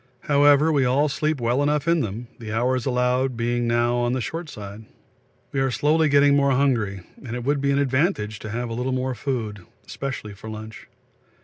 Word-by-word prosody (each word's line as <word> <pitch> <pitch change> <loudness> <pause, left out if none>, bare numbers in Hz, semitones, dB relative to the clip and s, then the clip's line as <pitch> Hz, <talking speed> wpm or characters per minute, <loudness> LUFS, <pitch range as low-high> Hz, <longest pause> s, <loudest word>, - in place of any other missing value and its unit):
However, 145 +2 +4
we 140 -3 +3
all 135 +4 +2
sleep 155 +1 -1
well 120 +3 +1
enough 150 +1 0
in 170 0 +3
them, 115 -1 -4
the 110 -2 -7
hours 125 +3 0
allowed 125 0 +1
being 120 0 0
now 120 +1 +2
on 120 0 0
the 130 - -1
short 165 +6 -5
side. 105 -2 -9 0.7
We 135 - -1
are 135 0 +2
slowly 155 +4 +2
getting 140 0 +5
more 140 -1 +3
hungry, 120 -8 +1 0.2
and 120 -2 -5
it 125 - -4
would 140 +2 0
be 140 - +1
an 140 - +2
advantage 130 - 0
to 110 - -7
have 120 +2 -3
a - - -2
little 125 +2 -2
more 130 0 -1
food, 110 -7 -4 0.2
especially 130 -6 -5
for 105 +3 -10
lunch. 110 0 -9
130 Hz, 200 wpm, -23 LUFS, 115-140 Hz, 0.7 s, getting